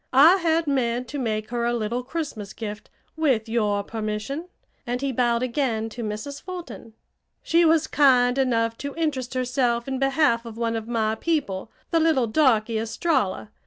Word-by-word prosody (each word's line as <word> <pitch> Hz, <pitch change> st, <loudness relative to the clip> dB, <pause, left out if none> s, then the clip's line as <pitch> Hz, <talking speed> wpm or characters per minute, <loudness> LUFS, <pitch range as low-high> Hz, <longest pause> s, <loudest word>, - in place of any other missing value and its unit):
"I 310 Hz, +8 st, +8 dB
had 330 Hz, -2 st, +1 dB
meant 250 Hz, -3 st, 0 dB
to 290 Hz, -, -4 dB
make 215 Hz, -3 st, -2 dB
her 240 Hz, -1 st, -1 dB
a 240 Hz, 0 st, +1 dB
little 235 Hz, +2 st, -2 dB
Christmas 255 Hz, -, -5 dB
gift, 210 Hz, -2 st, -7 dB, 0.3 s
with 265 Hz, -9 st, +1 dB
your 210 Hz, -3 st, 0 dB
permission," 220 Hz, -, -4 dB, 0.4 s
and 245 Hz, +1 st, -1 dB
he 275 Hz, 0 st, -1 dB
bowed 240 Hz, -1 st, +1 dB
again 235 Hz, -3 st, -1 dB
to 235 Hz, +2 st, -7 dB
Mrs. 220 Hz, +7 st, -5 dB
Fulton. 355 Hz, -11 st, -8 dB, 0.5 s
"She 335 Hz, +1 st, +3 dB
was 320 Hz, -1 st, +4 dB
kind 255 Hz, -4 st, +4 dB
enough 230 Hz, -3 st, +1 dB
to 280 Hz, 0 st, -5 dB
interest 275 Hz, -6 st, -2 dB
herself 250 Hz, -1 st, 0 dB
in 265 Hz, -1 st, -2 dB
behalf 270 Hz, -3 st, +2 dB
of 230 Hz, -2 st, -9 dB
one 230 Hz, -1 st, -1 dB
of 225 Hz, 0 st, -4 dB
my 220 Hz, -2 st, 0 dB
people, 220 Hz, -, -2 dB, 0.2 s
the 330 Hz, -, +3 dB
little 315 Hz, -6 st, +3 dB
darky, 225 Hz, -3 st, +2 dB
Estralla. 220 Hz, -, -1 dB
245 Hz, 165 wpm, -24 LUFS, 225-285 Hz, 0.5 s, I